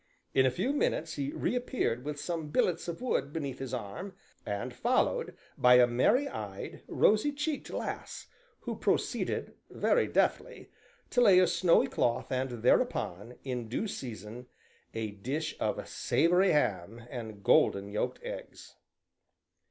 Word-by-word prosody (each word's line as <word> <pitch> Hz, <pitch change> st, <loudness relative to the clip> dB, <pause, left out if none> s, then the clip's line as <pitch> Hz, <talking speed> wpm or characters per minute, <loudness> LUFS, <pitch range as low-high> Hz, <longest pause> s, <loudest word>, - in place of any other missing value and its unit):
In 130 Hz, -1 st, +5 dB
a -, -, +4 dB
few 240 Hz, -, -1 dB
minutes 165 Hz, -, 0 dB
he 140 Hz, 0 st, -3 dB
reappeared 245 Hz, -, -1 dB
with 145 Hz, 0 st, -4 dB
some 165 Hz, -1 st, -3 dB
billets 170 Hz, +3 st, +1 dB
of 170 Hz, +7 st, -5 dB
wood 145 Hz, -, 0 dB
beneath 140 Hz, -5 st, -4 dB
his 135 Hz, -3 st, -5 dB
arm, 125 Hz, -, -5 dB, 0.3 s
and 120 Hz, +5 st, -3 dB
followed 255 Hz, -, 0 dB, 0.2 s
by 125 Hz, -1 st, +7 dB
a 125 Hz, 0 st, +8 dB
merry 130 Hz, -, +2 dB
eyed, -, -, -7 dB
rosy 215 Hz, +8 st, +3 dB
cheeked 295 Hz, +1 st, -3 dB
lass, -, -, -5 dB, 0.4 s
who -, -, -4 dB
proceeded, -, -, -1 dB, 0.2 s
very 485 Hz, -, +2 dB
deftly, -, -, 0 dB, 0.4 s
to 245 Hz, -, +3 dB
lay 195 Hz, -6 st, +7 dB
a 185 Hz, -, +7 dB
snowy 175 Hz, -2 st, +4 dB
cloth 120 Hz, -2 st, -1 dB
and 130 Hz, -3 st, -2 dB
thereupon 115 Hz, -2 st, +1 dB
in 125 Hz, -3 st, -4 dB
due 215 Hz, -, -2 dB
season, 120 Hz, -, -7 dB, 0.5 s
a 110 Hz, -2 st, -2 dB
dish 135 Hz, +10 st, -3 dB
of -, -, -2 dB
savory 180 Hz, +5 st, +2 dB
ham 115 Hz, -4 st, 0 dB
and 110 Hz, -5 st, -7 dB
golden 100 Hz, 0 st, +3 dB
yolked 105 Hz, -, -2 dB
eggs. -, -, -8 dB
135 Hz, 140 wpm, -30 LUFS, 120-190 Hz, 0.5 s, a